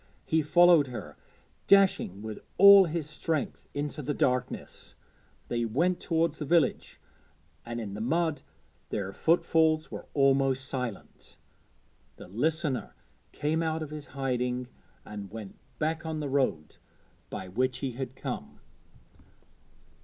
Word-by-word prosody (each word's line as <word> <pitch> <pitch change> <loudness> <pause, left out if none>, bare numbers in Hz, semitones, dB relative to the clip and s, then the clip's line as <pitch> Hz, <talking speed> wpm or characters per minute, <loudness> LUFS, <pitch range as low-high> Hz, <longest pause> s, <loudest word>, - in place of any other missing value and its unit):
He 160 0 +2
followed 170 -1 +5
her, 120 -5 -8 0.5
dashing 190 - +4
with 110 -1 -6 0.2
all 200 0 +9
his 160 -2 -3
strength 155 -1 -3
into 145 +1 -3
the 145 +1 -2
darkness. 125 -1 -2 0.5
They 120 0 -1
went 165 +11 +1
towards 165 -1 0
the 150 - -3
village, 165 +2 +1 0.7
and 120 0 -4
in 105 -4 -5
the 105 - -5
mud 160 +5 0 0.5
their 100 -1 -3
footfalls 160 -1 +2
were - - -7
almost 135 -1 +3
silent. 125 -7 -6 0.8
The - - -12
listener 145 - -1 0.4
came 155 +2 -1
out 160 -1 -1
of 150 - -8
his 150 -1 -7
hiding 125 -2 -2 0.4
and 105 -2 -7
went 105 -1 -9 0.2
back 160 +1 -1
on 160 -1 -3
the 145 -2 -3
road 130 - -1 0.5
by 95 - -6
which 125 +7 -1
he 135 0 -3
had 130 +1 -6
come. - - -6
140 Hz, 130 wpm, -29 LUFS, 125-160 Hz, 0.8 s, all